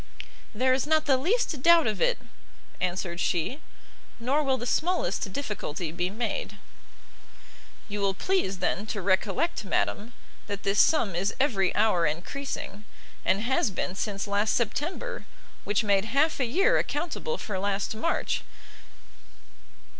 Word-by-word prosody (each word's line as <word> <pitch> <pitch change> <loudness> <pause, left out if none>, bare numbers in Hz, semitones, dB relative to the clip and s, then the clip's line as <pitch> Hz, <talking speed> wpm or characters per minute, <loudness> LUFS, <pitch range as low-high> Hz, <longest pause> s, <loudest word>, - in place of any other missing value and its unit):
"There 255 +3 +3
is 265 +2 0
not 315 0 +3
the 275 - +4
least 340 - 0
doubt 335 +1 +7
of 215 -2 -1
it," - - +3 0.6
answered 175 -1 -2
she; 180 - 0 0.6
"nor 265 +6 +1
will 270 -3 +1
the 240 - -5
smallest 280 - 0
difficulty 185 - -4
be 175 +2 -1
made." 210 -1 -3 1.3
"You 205 -1 -4
will 195 -1 +1
please, 360 - 0
then, 190 +3 -1
to 215 - -3
recollect, 200 - +1
madam, 210 +3 -1 0.3
that 200 -1 -4
this 200 +1 +2
sum 235 - +4
is 190 +4 -1
every 205 -9 +2
hour 205 -6 +3
encreasing; 200 - -5 0.4
and 195 +2 +2
has 245 -1 +2
been 185 -1 -3
since 200 0 -3
last 205 +1 +1
September, 345 - -2 0.4
which 205 +2 +1
made 200 -1 +2
half 280 +8 +2
a 255 - +2
year 390 - +3
accountable 350 - -2
for 195 -3 -4
last 200 +1 -1
March. 330 +10 -1
215 Hz, 140 wpm, -27 LUFS, 195-290 Hz, 1.3 s, doubt